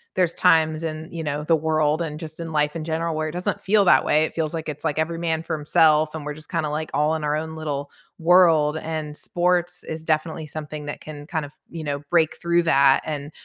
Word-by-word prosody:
there's 180 -3 +2
times 160 -3 +3
in, 155 0 -4
you 165 -1 -5
know, 150 0 -2
the 165 - +4
world 155 0 +1
and 155 -2 -4
just 160 0 -8
in 165 -1 -5
life 150 0 +1
in 165 - -4
general 165 0 -2
where 155 0 -1
it - - -6
doesn't 180 +2 -3
feel 200 0 +3
that - - +6
way. 155 +1 +3
It - - -7
feels 160 -1 -1
like 160 - -5
it's, 150 -1 -6
like, 150 - -1
every 165 +1 -1
man 165 -1 -1
for 165 -1 -2
himself 155 +1 +3
and 155 -2 -6
we're 150 - -3
just 155 0 -12
kinda 155 - -1
like 155 +1 -3
all 150 +3 +2
in 155 - -4
our 150 0 +1
own 160 +1 -5
little 145 -3 -4 0.3
world, 165 -3 +5
and 155 -2 -4
sports 175 +1 0
is 160 0 -6
definitely 160 0 -1
something 150 0 -7
that 145 - -5
can 145 -1 -9
kind 160 -3 -2
of, 145 - -12 0.2
you 165 -1 -7
know, 145 -1 -2
break 165 -3 +3
through 170 0 +2
that 140 -4 +4
and, 145 -1 -5
155 Hz, 240 wpm, -23 LUFS, 150-165 Hz, 0.3 s, that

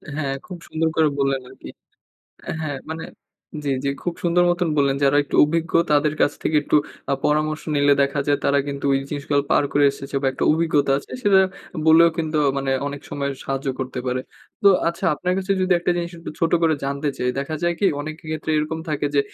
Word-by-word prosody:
হ্যাঁ, 140 -3 -2
খুব 180 - -8
সুন্দর 160 0 -1
করে 160 -1 +5
বললেন 135 -1 +1
আরকি - - -12 0.9
হ্যাঁ, 145 -3 -3
মানে 160 0 -5 0.6
জি, 140 - 0
জি। - - +1
খুব 175 -1 -2
সুন্দর 175 0 +3
মতন 175 -1 0
বললেন। 140 -1 +2
যারা 140 +1 +4
একটু - - -10
অভিজ্ঞ, 165 +1 -2 0.2
তাদের 150 +1 +3
কাছ 145 - +3
থেকে 155 - +1
একটু 150 - +2 0.4
আ - - +4
পরামর্শ 155 0 +1
নিলে 145 0 +4
দেখা 140 +1 0
যায় 145 -1 +2
তারা 140 0 +3
কিন্তু 140 0 -5
ওই 135 - +3
জিনিসগুলো 145 -1 0
পার 145 - +4
করে 145 0 +3
এসেছে 140 0 -7
বা, - - +1
একটা - - -2
অভিজ্ঞতা 155 -4 +2
আছে। - - -13
সেটা 195 -3 +5 0.3
আ - - -7
বললেও 165 +1 +7
কিন্তু 155 -1 -1 0.2
মানে 135 0 -2 0.2
অনেক 145 0 -5
সময় 140 -1 -2
সাহায্য 135 0 -3
করতে 130 0 -4
পারে। 125 0 0 0.4
তো 200 - +7 0.2
আচ্ছা, 170 - -5
আপনার 180 +4 -2
কাছে 195 +1 0
যদি 185 0 +2
একটা 180 - 0
জিনিস 170 0 -3
একটু 165 - -7
ছোট 165 0 +1
করে 160 -1 +4
জানতে 140 +2 -2
চাই, 125 - -1
দেখা 140 +3 -3
যায় 175 0 +1
কি 200 - +2
অনেকের 155 +1 -7
ক্ষেত্রে 155 0 -3
এরকম 155 +2 -2
থাকে 150 -1 -1
যে 140 - +5
150 Hz, 210 wpm, -22 LUFS, 140-165 Hz, 0.9 s, বললেও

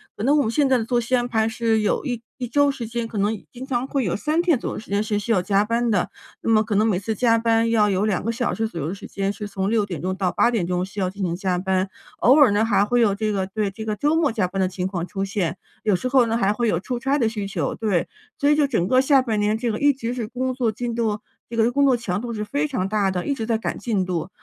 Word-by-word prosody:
可 - - -5
能 280 +5 +4
我 - - +4
们 225 - 0
现 280 +4 +2
在 265 -1 +4
的 - - -1
作 245 0 +1
息 240 +2 0
安 245 -1 0
排 220 -2 +1
是 225 -1 +1
有 210 - 0
一 245 -4 -3 0.2
一 250 - -4
周 285 +4 +3
时 245 -4 -6
间， 235 0 -3
可 225 - -7
能 205 +2 +1 0.2
经 255 +1 -8
常 255 -1 -1
会 275 -2 -1
有 180 - -1
3 305 +10 0
天 340 -7 +2
左 - - -4
右 - - -5
时 215 - -13
间 200 +1 +1
是 210 -1 -1
需 220 +3 -3
要 195 -5 +3
加 195 +2 +2
班 230 +2 0
的， 205 -5 +1 0.3
那 - - -2
么 220 -1 +4
可 210 -1 -2
能 215 +2 +3
每 190 -5 +1
次 220 +3 -3
加 230 0 +3
班 230 0 +2
要 215 -2 +3
有 195 +1 +1
2 210 -4 0
个 230 - 0
小 235 +1 -1
时 225 0 -1
左 175 -6 -7
右 145 - -2
的 180 - -3
时 - - -10
间， 195 0 -2
是 210 0 -6
从 195 -1 -2
6 220 -2 +2
点 175 -7 -6
钟 185 +2 -2
到 190 -2 0
8 240 - +3
点 220 -7 0
钟 180 0 -1
需 195 +2 -8
要 185 -2 +1
进 195 +1 -6
行 170 -2 -1
加 185 -1 -1
班。 190 +1 0 0.3
偶 260 +4 +5
尔 275 -7 +7
呢， 205 +2 +2
还 205 -2 +3
会 240 +3 +2
有 205 -4 +3
这 215 +1 -1
个 190 -2 -1
对， 205 0 -2
这 220 +2 -7
个 215 - -1
周 295 +8 +1
末 320 -5 +2
加 215 -5 0
班 195 +2 -5
的 185 - +2
情 180 0 -4
况 180 -3 -3
出 195 +1 -3
现， 190 -3 -2 0.3
有 210 -4 +3
时 185 - -2
候 255 -1 +4
呢 225 0 0
还 205 -2 +2
会 235 +2 0
有 170 -6 +1
出 240 +6 -4
差 270 +3 +1
的 230 - +2
需 210 -3 -4
求， 195 - -2
对。 205 -6 0 0.3
所 285 - +3
以 295 - +5
就 295 - +3
整 225 -10 0
个 255 +4 +4
下 270 0 +4
半 230 -4 -1
年 210 +1 +1
这 235 +1 -2
个 215 - -1
一 285 0 +6
直 245 -2 -4
是 235 -4 -4
工 255 +2 -2
作 245 -3 0
进 235 +1 -4
度， 220 -3 0 0.3
这 230 - -6
个 230 +1 +4
工 280 +2 +3
作 260 -3 +4
强 200 -4 -3
度 235 -1 -5
是 210 -1 -3
非 285 +7 -1
常 255 -11 -2
大 200 -1 +1
的， 180 -1 -3
一 285 - +1
直 225 - -4
在 225 0 +1
赶 225 - -3
进 205 -6 -1
度， 175 -1 -3
220 Hz, 325 characters per minute, -23 LUFS, 195-245 Hz, 0.3 s, 尔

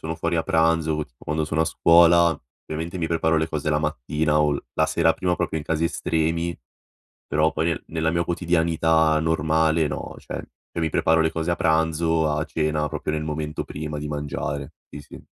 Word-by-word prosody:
sono 80 +1 -4
fuori 85 +1 -1
a 80 - +1
pranzo, 80 0 +2
o 75 0 -2
tipo - - -30
quando 75 +1 -1
sono 80 +1 -1
a - - +4
scuola, 85 0 +5 0.2
ovviamente, 80 +3 -5
mi 85 -2 -1
preparo 80 -1 +1
le 80 0 +1
cose 80 -1 -3
la 75 - +2
mattina 75 +1 0
o 75 -1 +3
l 70 - -4
la - - +2
sera - - +2
prima, 90 -1 -1
proprio, 85 -2 -2
in 75 - -8
casi 80 0 -1
estremi, 85 0 -1 0.7
però 80 +1 +2
poi 80 +1 -1
nella 80 0 -1
mia 85 +1 0
quotidianità 80 -2 +2
normale, 80 0 +2
no 70 -2 -5
cioè, - - -9 0.4
io - - -2
mi 80 -1 0
preparo 80 +2 +2
le 80 0 +2
cose 80 +2 -1
a - - -1
pranzo, 80 -1 +1
a 75 +1 0
cena, 75 -1 -1
proprio 75 0 -4
nel 75 - -2
momento 75 0 -3
prima 75 0 -6
di 75 - -5
mangiare. 70 -1 -4 0.2
Sì, 75 - -8
sì. 70 - -13
80 Hz, 200 wpm, -23 LUFS, 75-80 Hz, 0.7 s, scuola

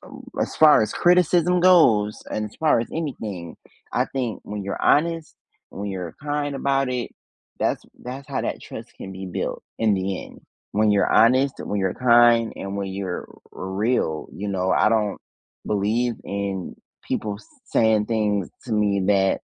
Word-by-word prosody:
ooh, - - -12 0.2
as - - -2
far 155 -5 +7
as 110 - -1
criticism 180 0 +3
goes, 130 - +5
and 105 - -2
as 105 - -10
far 155 -6 +3
as 115 - -3
anything, 110 - -5 0.4
I - - +2
think 125 -5 -3
when 105 -1 -5
you're 100 0 -4
honest, 165 +1 +2 0.3
when 100 +1 -5
you're 90 -4 -6
kind 145 -1 -2
about 135 -1 +1
it, 125 -1 -3 0.5
that's - - 0 0.2
that's 130 +3 -7
how 140 - -2
that - - -3
trust - - -9
can 95 - -8
be 95 0 -7
built 90 - -3 0.2
in 110 -2 +3
the 95 0 -2
end. - - -15 0.3
When 110 +1 +2
you're 100 -1 +2
honest, 130 +5 +4
when 105 - -3
you're 95 -1 0
kind, 120 -2 +5
and 100 0 -5
when 100 -1 -2
you're 95 -2 -4 0.3
r 95 - -6
real, 95 -5 0
you 105 - -5
know, 95 -1 0
I - - +4
don't 110 -2 0 0.5
believe 110 +4 0
in 100 -2 -4 0.3
people 105 -2 -2
s 110 - -18 0.2
saying 110 -2 +2
things 105 -4 0 0.2
to 120 - -6
me 105 -2 +2
that 95 -2 +2
110 Hz, 170 wpm, -23 LUFS, 100-130 Hz, 0.5 s, far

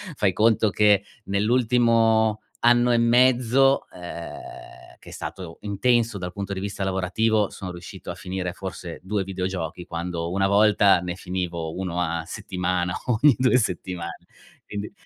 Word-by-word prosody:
fai 100 -6 +2
conto 110 +1 +3
che 105 -1 +4 0.2
nell'ultimo 115 0 +2 0.2
anno 120 +1 +4
e - - +4
mezzo, 125 +2 +4
uhm, 85 -1 -8 0.6
che - - -14
è - - -11
stato 90 -4 -7
intenso 115 +1 +1
dal 90 -1 -5
punto 100 0 -4
di 95 - -4
vista 100 0 -4
lavorativo, 100 +3 +1
sono 95 -2 -7
riuscito 85 0 -10
a - - -4
finire 90 -1 -4
forse 90 -3 -7
2 100 0 -1
videogiochi 90 -2 -4
quando 85 0 -4
una 95 +1 +1
volta 100 -2 +5
ne 90 0 -3
finivo 90 -3 -4
1 90 -2 -2
a 85 -1 -1
settimana 90 0 -2
ogni 125 +2 +4
2 125 0 +4
settimane. 90 -5 -3 0.4
Quindi, 105 0 -6
100 Hz, 145 wpm, -24 LUFS, 90-110 Hz, 0.6 s, volta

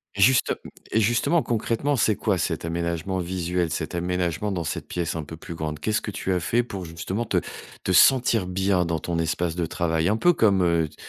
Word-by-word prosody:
Justem 115 +6 +4 0.4
et 110 - +3
justement, 120 +9 +2
concrètement, 120 +5 0
c'est 110 -3 +2
quoi 100 -4 0
cet - - -2
aménagement 85 +2 -2
visuel, 90 -1 -1
cet - - -3
aménagement 90 +2 -1
dans 90 -3 -2
cette 80 - -4
pièce 85 -2 -3
un 80 - -3
peu 80 +2 -9
plus 85 - -8
grande? 75 -2 -4
Qu'est 110 - -1
ce 110 - +1
que - - -5
tu 95 -1 -2
as 90 - +1
fait 115 +8 +1
pour, 100 -6 -6
justement, 90 +7 -4
te - - 0 0.5
te - - -1
sentir 115 -1 +5
bien 90 -1 +1
dans 85 -1 -1
ton 85 +2 -3
espace 85 +1 -1
de 85 -2 -1
travail? 80 -1 0
Un 110 - +2
peu 175 +8 +4
comme, 100 - +3
heu, 85 -2 +2
t - - -20
90 Hz, 215 wpm, -24 LUFS, 85-105 Hz, 0.5 s, sentir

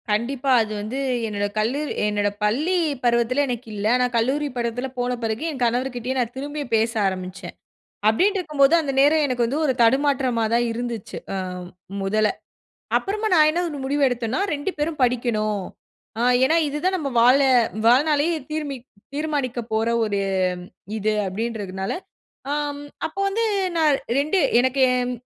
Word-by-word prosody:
கண்டிப்பா 250 +6 0
அது 215 -1 -3
வந்து, 225 +6 -4 0.3
என்னோட 205 -1 -2
கல்லூரி 265 +8 -1 0.2
என்னோட 205 -1 +1
பள்ளி 295 - +1 0.3
பருவத்தில 240 +3 +2
எனக்கு 245 -1 -4
இல்ல, 205 0 -4
ஆனா 250 0 +3
கல்லூரி 270 +6 +1
பருவத்தில 240 +2 -2
போன 245 0 0
பிறகு, 225 +5 -2
என் 265 -4 -8
கணவர்கிட்டயும் 250 +1 -1
நான் 240 -1 -1
திரும்பி 290 +2 -4
பேச 225 +1 +2 0.2
ஆரம்பிச்சேன், 185 0 -6 0.5
அப்டின்னு 380 - +3
இருக்கும்போது 300 -4 +2
அந்த 285 -3 -2
நேரம் 300 +2 +4
எனக்கு 250 -3 0
வந்து 270 +6 -1
1 265 - +2
தடுமாற்றமா 260 -2 +2
தான் 240 0 +2
இருந்துச்சு, 235 -2 -5 0.2
ஆ, - - -1 0.6
1ல 215 +2 +2 0.7
அப்புறமா 425 +2 -2
நான் 310 -3 +6
என்ன 345 +3 0
1 295 - -6
முடிவு 285 +2 0
எடுத்தேன்னா, 240 +1 -2
2 290 +6 -2
பேரும் 300 +1 -2
படிக்கணும், 220 -4 0 0.6
ஆ, - - 0 0.2
ஏனா 315 +5 +3
இதுதான் 300 +7 -1
நம்ம 295 -5 -3
வாழ 250 +4 +6 0.5
வாழ்நாளே 290 +5 +4 0.2
தீர்ம 300 -2 -3 0.4
தீர்மானிக்கப் 275 -6 -2
போற 220 +1 +1
1 205 -2 -1 0.8
இது, 215 0 0
அப்டின்றதுனால, 195 -2 -3 0.6
ஆம் 290 -1 -2 0.3
அப்போ 385 +5 -6
வந்து 445 +4 0 0.3
நான் 305 -4 +3 0.2
2 305 +7 +1 0.2
எனக்கு 260 +2 +1
என் 250 0 0
250 Hz, 145 wpm, -23 LUFS, 225-290 Hz, 0.8 s, நான்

